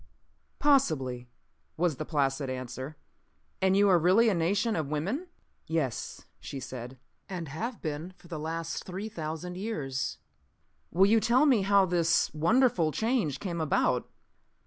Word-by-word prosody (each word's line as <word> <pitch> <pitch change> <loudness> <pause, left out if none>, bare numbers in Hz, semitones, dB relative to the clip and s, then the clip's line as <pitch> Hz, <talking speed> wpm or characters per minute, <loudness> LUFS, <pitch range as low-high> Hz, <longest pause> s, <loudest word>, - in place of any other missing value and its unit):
"Possibly," 135 - +2 0.5
was 165 -4 +1
the 155 - -4
placid 140 -3 0
answer. 130 +3 -6 0.6
"And 190 0 +3
you 205 0 +5
are 180 -3 +5
really 190 +8 +5
a - - +2
nation 200 +6 +1
of 155 -4 -2
women?" 195 - -2 0.4
"Yes," 155 -7 -2
she 140 - -6
said. 125 0 -7 0.3
"And 175 -5 -5
have 220 - -5
been 160 +4 -4
for 175 - -17
the 165 -3 -5
last 165 +1 -4
three 190 +4 -5
thousand 165 0 -5
years." 135 - -3 0.7
"Will 185 +4 +4
you 220 +3 +5
tell 240 +6 +4
me 255 -8 +4
how 200 0 +4
this 170 -2 +2
wonderful 170 - +3
change 220 - 0
came 175 -4 -3
about?" 155 - +1
170 Hz, 145 wpm, -29 LUFS, 150-200 Hz, 0.7 s, you